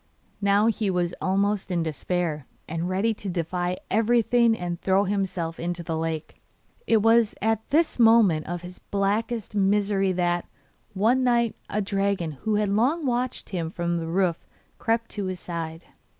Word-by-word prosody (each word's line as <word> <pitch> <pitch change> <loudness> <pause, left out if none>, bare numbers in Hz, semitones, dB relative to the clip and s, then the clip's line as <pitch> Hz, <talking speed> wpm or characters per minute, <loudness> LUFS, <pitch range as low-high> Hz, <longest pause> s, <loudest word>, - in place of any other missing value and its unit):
Now 200 +1 +3
he 220 -2 +1
was 175 -2 0
almost 200 +1 0
in 175 -2 0
despair, 160 -1 -2 0.2
and 165 +2 -3
ready 200 +5 +1
to 200 -2 -7
defy 175 +1 -2
everything 230 +1 +3
and 175 -1 -4
throw 195 +1 +3
himself 185 -4 -2
into 175 0 -3
the 165 0 -3
lake. 160 -1 -4 0.5
It 220 -2 +3
was 225 -1 +4
at 220 0 -1
this 315 -2 +2
moment 225 -9 +5
of 175 +1 -4
his 180 +1 -9
blackest 210 +3 -1
misery 200 -1 +2
that, 175 -1 0 0.5
one 235 +7 +3
night, 235 -2 +2
a 210 0 -1
dragon 195 -4 -1
who 210 +9 -2
had 210 -1 +1
long 260 +11 +1
watched 250 0 -1
him 170 -4 -3
from 170 0 -2
the 165 - -4
roof 175 0 0 0.4
crept 230 0 0
to 205 -2 -3
his 185 -1 -4
side. 165 -1 -5
195 Hz, 160 wpm, -25 LUFS, 175-220 Hz, 0.5 s, moment